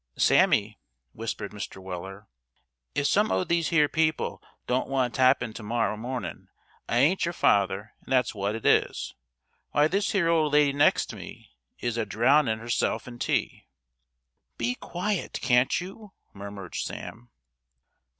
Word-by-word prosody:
"Sammy," - - +3 0.3
whispered 115 -2 -5
Mr. 105 -2 -7
Weller, 95 +2 -8 0.7
"if 145 - 0
some 210 +9 +3
o' - - +2
these 170 -2 0
here 150 -3 +4
people 155 0 0 0.2
don't 125 +2 0
want 130 -3 0
tappin' 130 -3 +3
to - - -8
morrow 115 0 -1
mornin', 125 +4 -5 0.4
I 120 - +1
ain't 155 +10 +3
your 170 - -1
father, 100 +1 +1
and - - -14
that's 130 -2 +2
wot 100 0 -2
it 115 - -7
is. - - +2 0.6
Why 145 +1 +4
this 200 +5 0
here 190 -5 +2
old 160 -3 +2
lady 145 -1 +4
next 145 - +2
me - - -11 0.3
is 120 -1 -3
a 115 - 0
drown 130 +8 +3
in' 110 0 0
herself 115 +2 -1
in 120 -1 -9
tea." - - -1 0.9
"Be 120 +1 0
quiet, 180 +8 -3
can't 125 0 +3
you?" 195 +3 -10 0.2
murmured 100 -2 -9
Sam. 120 +1 -6
125 Hz, 150 wpm, -27 LUFS, 110-155 Hz, 0.9 s, here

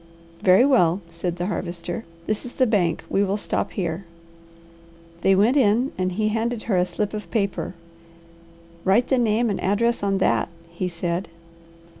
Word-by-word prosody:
"Very 190 +6 +6
well," 185 -11 +4
said 170 +1 -3
the 175 0 -3
Harvester. 175 +1 -4 0.2
"This 215 +2 -2
is 250 - -8
the 260 - +3
bank. 185 -8 +1
We 195 - +2
will 200 +1 0
stop - - -2
here." 175 -1 -2 1.2
They 195 +1 +4
went 215 +7 +4
in 245 0 +3
and 185 0 -1
he 215 +3 +1
handed 225 +1 -1
her 215 - 0
a 180 0 +2
slip 200 +4 -3
of 210 -5 -6
paper. 200 -2 -1 1.1
"Write 200 +6 +3
the 265 - +3
name 230 0 +2
and 200 - -3
address 235 +5 +1
on 200 -1 +1
that?" 190 - +1 0.2
he 175 +2 -3
said. 175 +1 -3
200 Hz, 165 wpm, -23 LUFS, 180-225 Hz, 1.2 s, Very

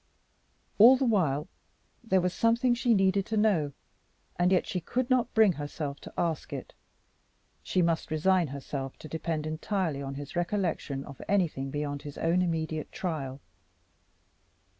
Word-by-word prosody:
All 245 +5 +9
the 265 - +1
while 160 - +1 0.6
there 190 -5 +2
was 180 0 0
something 235 +2 +3
she 240 -1 +2
needed 195 0 +3
to 220 - -1
know, 190 -9 +2 0.6
and 180 +1 +2
yet 185 - +3
she 180 - -2
could 250 +8 -2
not 250 -2 +2
bring 220 -3 +6
herself 145 -1 -5
to - - -10
ask 165 -4 -1
it. - - -6 0.9
She 180 - +1
must 165 -1 0
resign 175 +2 +2
herself 135 0 -5
to - - -10
depend 160 -1 -3
entirely 155 -1 -2
on 135 0 -5
his 145 0 -8
recollection 170 -6 -1
of 140 -2 -10
anything 170 -9 0
beyond 145 0 -3
his 145 -1 -9
own 170 +2 +2
immediate 160 -3 -2
trial. 145 -7 -4
170 Hz, 150 wpm, -29 LUFS, 145-200 Hz, 0.9 s, All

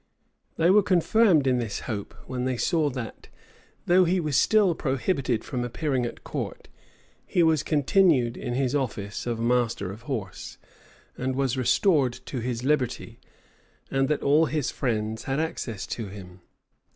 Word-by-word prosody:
They 165 +2 +3
were 210 +2 +6
confirmed 185 -3 +3
in 130 -2 +2
this 115 -4 -3
hope, 105 -5 -5
when 125 -1 -3
they 130 -1 -1
saw 155 - +1
that, 125 -4 -7 0.6
though 180 +1 +5
he 180 +2 +2
was 155 -5 -1
still 210 0 +4
prohibited 135 - -1
from 125 -3 -3
appearing 125 0 -1
at - - -10
court, - - -5 0.5
he 175 - +1
was 160 -2 +3
continued 145 -5 +3
in 120 -2 -4
his 130 0 0
office 115 -7 -3
of 120 -1 -2
master 115 -5 0
of 105 +3 -10
horse, 105 -9 -5 0.6
and 130 +1 -1
was 135 -1 0
restored 135 - +2
to 130 - -7
his 120 0 -3
liberty, 135 -3 -1 0.7
and 135 0 +1
that 150 - 0
all 150 +3 +4
his 150 -3 -1
friends 110 -3 -2
had 135 +1 -1
access 145 - -3
to 115 -3 -5
him. 95 -2 -11
130 Hz, 155 wpm, -26 LUFS, 120-155 Hz, 0.7 s, were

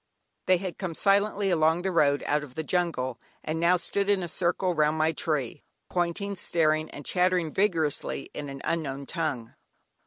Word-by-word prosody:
They 185 - +5
had 185 -1 -6
come 180 -4 -3
silently 200 +1 +2
along 160 +1 +3
the 190 - 0
road 145 -4 +3
out 150 +1 +1
of 135 -3 -10
the 160 - -2
jungle, 155 -8 -1 0.2
and 155 +1 -2
now 175 +2 +4
stood 200 +3 -1
in 200 -3 +2
a - - -3
circle 180 +2 0
round 155 -1 +2
my 155 +1 +3
tree, 150 -4 -2 0.3
pointing, 180 +3 -1
staring, 155 -3 +1
and 145 - -10
chattering 180 -3 +1
vigorously 165 -8 0
in 145 -1 -5
an 135 0 -8
unknown 140 -4 -2
tongue. 135 -8 -3
165 Hz, 175 wpm, -27 LUFS, 150-180 Hz, 0.3 s, They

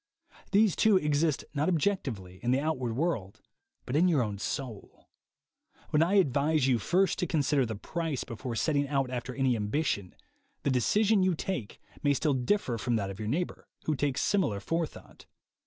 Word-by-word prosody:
These, 205 -2 +4
too, 215 -3 +5
exist 150 -1 +1
not 150 +3 +1
objectively, 130 - -1
in 120 - -1
the 130 +2 +3
outward 130 -6 -1
world, 120 - -2 0.5
but 125 - -3
in 170 +4 +5
your 155 -8 +3
own 105 -3 -4
soul. 125 -3 -6 0.8
When 150 - +3
I 175 +5 +3
advise 150 -4 +3
you 125 -3 +3
first 185 - +1
to 180 - 0
consider 145 -5 +1
the 110 - -4
price 160 +5 -3
before 115 0 -6
setting 145 +3 +1
out 135 -2 0
after 125 0 -4
any 130 -3 +2
ambition, 105 - -1 0.5
the 140 - +1
decision 205 - +3
you 185 -2 +2
take 155 - -4 0.2
may 145 -2 +3
still 150 +2 +1
differ 130 - 0
from 120 +1 0
that 100 -3 -1
of 95 - -10
jour 105 - -4
neighbor 165 +10 -2 0.2
who 155 - 0
takes 140 -1 0
similar 185 - +1
forethought. 165 +7 -4
140 Hz, 170 wpm, -29 LUFS, 120-165 Hz, 0.8 s, too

